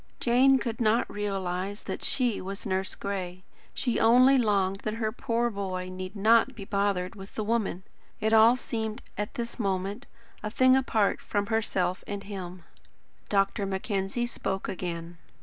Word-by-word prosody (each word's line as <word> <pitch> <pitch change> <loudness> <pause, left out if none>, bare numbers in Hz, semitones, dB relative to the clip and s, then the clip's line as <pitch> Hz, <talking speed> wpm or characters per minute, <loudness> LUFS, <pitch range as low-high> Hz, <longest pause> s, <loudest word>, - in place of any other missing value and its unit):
Jane 260 +3 +5
could 235 -3 -3
not 225 +1 +3
realise 195 -1 -3
that - - -5
SHE 245 -5 0
was 195 +2 -6
"Nurse 190 0 -1
Gray." 185 -2 -4 0.3
She 240 -3 0
only 250 +4 +6
longed 200 -5 +2
that 215 +1 -3
her 220 -1 -1
poor 235 +1 -1
boy 185 -3 -4
need 185 +2 -6
not 225 +5 +4
be 200 - -8
bothered 200 -2 0
with 195 -2 -11
the 215 - -1
woman! 210 -4 -1 0.4
It 220 +1 +1
all 225 +2 +7
seemed, 220 -3 -4
at 210 0 -4
this 235 0 -4
moment, 200 +3 -2 0.3
a 210 - -3
thing 255 +3 +5
apart 225 -6 +1
from 205 -1 -1
herself 185 -5 0
and 200 -1 -4
him. 185 -3 -7 0.7
Dr. 195 0 +1
Mackenzie 195 +3 -1
spoke 195 -5 -3
again. 170 -2 -5
205 Hz, 155 wpm, -28 LUFS, 190-230 Hz, 0.7 s, all